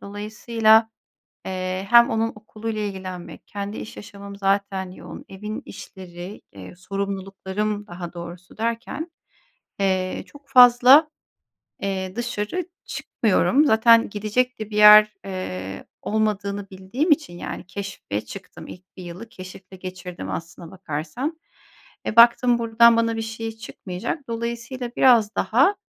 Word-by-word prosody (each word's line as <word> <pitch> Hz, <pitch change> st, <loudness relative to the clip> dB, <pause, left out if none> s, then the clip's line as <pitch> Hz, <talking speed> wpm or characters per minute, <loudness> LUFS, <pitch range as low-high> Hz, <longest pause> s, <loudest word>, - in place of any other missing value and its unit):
dolayısıyla, 220 Hz, +2 st, +2 dB, 0.6 s
eee, 185 Hz, +1 st, -3 dB
hem 235 Hz, 0 st, +7 dB
onun 225 Hz, +1 st, 0 dB
okuluyla 215 Hz, 0 st, -6 dB
ilgilenmek, 185 Hz, -3 st, -7 dB
kendi 205 Hz, +1 st, -5 dB
iş -, -, -8 dB
yaşamım 200 Hz, -1 st, -10 dB
zaten 195 Hz, -1 st, -1 dB
yoğun, -, -, -11 dB
evin 210 Hz, +3 st, -6 dB
işleri, 180 Hz, +1 st, -10 dB
eee, 95 Hz, -, -11 dB
sorumluluklarım 195 Hz, +2 st, -4 dB
daha 175 Hz, 0 st, -8 dB
doğrusu 175 Hz, +2 st, -10 dB
derken, 235 Hz, +8 st, -3 dB, 0.7 s
eee, 185 Hz, -1 st, 0 dB
çok 285 Hz, -1 st, -17 dB
fazla, 250 Hz, +5 st, +7 dB, 0.7 s
eee, 190 Hz, -1 st, -3 dB
dışarı 240 Hz, -, -3 dB, 0.2 s
çıkmıyorum. 225 Hz, +6 st, +1 dB
Zaten 230 Hz, -1 st, +5 dB
gidecek 215 Hz, +5 st, -1 dB
de 215 Hz, 0 st, -6 dB
bir 210 Hz, -, -4 dB
yer, 210 Hz, 0 st, +9 dB
eee, 95 Hz, -, -6 dB, 0.2 s
olmadığını 205 Hz, -2 st, -1 dB
bildiğim 195 Hz, -, -2 dB
için, 285 Hz, -, +1 dB
yani, -, -, -6 dB
keşfe 185 Hz, -, -5 dB
çıktım. 195 Hz, -2 st, -11 dB
İlk 185 Hz, +1 st, -13 dB
1 185 Hz, -, -8 dB
yılı 180 Hz, +6 st, -9 dB
keşifle 185 Hz, 0 st, -12 dB
geçirdim 180 Hz, -, -7 dB
aslına 165 Hz, -, -7 dB
bakarsan. 190 Hz, -, -5 dB, 0.7 s
E, 220 Hz, -, -3 dB
baktım 235 Hz, +1 st, +6 dB
buradan 230 Hz, 0 st, +5 dB
bana 230 Hz, 0 st, +1 dB
bir -, -, -2 dB
şey 225 Hz, 0 st, -5 dB
çıkmayacak. 220 Hz, -, -6 dB
Dolayısıyla 235 Hz, +2 st, -4 dB
biraz 230 Hz, -5 st, +5 dB
daha, 275 Hz, -, +3 dB
205 Hz, 125 wpm, -23 LUFS, 185-230 Hz, 0.7 s, yer